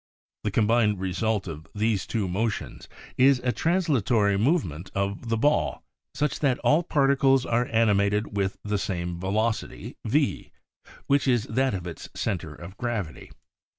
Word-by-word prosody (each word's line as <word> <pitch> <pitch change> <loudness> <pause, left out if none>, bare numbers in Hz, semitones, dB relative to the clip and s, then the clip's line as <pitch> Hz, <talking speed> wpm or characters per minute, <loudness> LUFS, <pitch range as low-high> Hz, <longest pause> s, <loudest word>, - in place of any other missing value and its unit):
The 105 - 0
combined 105 -1 +2
result 95 +2 -1
of 80 -1 -7
these 105 -2 0
two 110 -5 -1
motions 105 +5 -3 0.3
is 135 +1 +6
a 125 -1 +1
translatory 130 - +2
movement 100 - 0
of 100 +3 -2
the 115 - +1
ball 145 +7 +1 0.3
such 150 -1 -1
that 135 -4 +2
all 150 +3 +4
particles 135 -4 +3
are 120 +1 +1
animated 105 -2 +2
with 100 -1 -1
the 105 -1 -1
same 85 -3 -3
velocity 110 +5 -2
V, - - 0 0.5
which 140 0 +2
is 120 -4 +3
that 130 +1 0
of 90 -2 -5
its 85 -3 -7
center 85 -8 -3
of 85 +5 -10
gravity. 115 -10 -4
110 Hz, 145 wpm, -26 LUFS, 95-125 Hz, 0.5 s, is